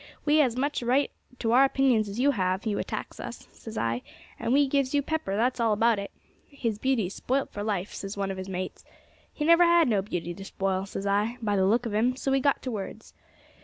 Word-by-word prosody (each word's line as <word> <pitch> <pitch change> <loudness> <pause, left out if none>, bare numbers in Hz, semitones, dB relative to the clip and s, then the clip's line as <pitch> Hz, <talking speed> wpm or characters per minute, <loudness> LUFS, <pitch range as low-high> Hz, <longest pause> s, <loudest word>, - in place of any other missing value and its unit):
'We 300 +1 +4
has 270 -6 +4
as - - -9
much 285 +2 0
right 255 +4 +2 0.3
to 225 -2 -1
our 255 +3 +6
opinions 260 -6 +2
as 200 +4 -5
you 280 +3 +4
have; 185 -4 -1
you 210 -2 0
attacks - - -5
us,' - - -8
says 225 -1 -10
I, 115 +1 -1 0.4
'and 230 - -1
we 285 +2 +5
gives 275 0 +1
you 285 - +2
pepper, 310 -11 -2
that's 245 +3 +1
all 225 -2 +3
about 225 0 +3
it.' 200 - -5 0.4
'His 230 -7 -3
beauty's 230 -8 0
spoilt 270 +2 -1
for 205 - -5
life,' 205 -2 -2
says 195 +1 -6
one 195 -1 -1
of 190 - -5
his 190 0 -6
mates. 185 0 -5 0.5
'He 300 - -3
never 335 +2 +7
had 340 -2 +5
no 210 -5 +2
beauty 175 -3 -4
to 195 - -9
spoil,' 195 0 -2
says 195 - -5
I, 205 +4 +1
'by 210 -3 0
the 190 -1 +3
look 235 +4 +2
of 225 - -3
'im,' 240 +4 +2
so 270 +1 -2
we 270 - +3
got 280 +1 +1
to 255 - -3
words. 215 0 -7
225 Hz, 240 wpm, -27 LUFS, 200-270 Hz, 0.5 s, never